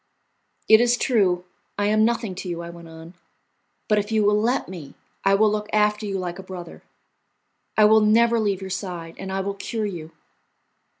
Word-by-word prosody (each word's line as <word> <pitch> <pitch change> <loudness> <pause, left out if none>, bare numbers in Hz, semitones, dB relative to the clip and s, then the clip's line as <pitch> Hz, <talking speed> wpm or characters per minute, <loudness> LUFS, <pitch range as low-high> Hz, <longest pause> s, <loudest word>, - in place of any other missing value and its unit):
"It 220 +1 +7
is 240 0 +3
true 185 -9 +1 0.3
I 205 - 0
am 215 +1 +3
nothing 230 -3 0
to 185 0 -7
you," 170 -1 -4
I 170 - -8
went 170 -1 -12
on, 165 +1 -12 0.7
"but 210 -1 +3
if 205 +2 -4
you 220 -1 +2
will 210 +1 +3
let 240 +4 0
me, 165 -7 -10 0.3
I 195 0 +4
will 215 +1 +3
look 210 0 -3
after 210 0 +1
you 195 -1 -2
like 180 -1 -5
a - - -5
brother, 185 -3 -9 1.0
I 215 - +6
will 220 +1 +6
never 230 +2 +4
leave 200 -3 -1
your 190 0 -6
side, 175 -3 -5
and 190 - -6
I 195 0 -1
will 200 +1 -3
cure 215 +2 -4
you. 170 -6 -6
200 Hz, 195 wpm, -23 LUFS, 180-215 Hz, 1.0 s, It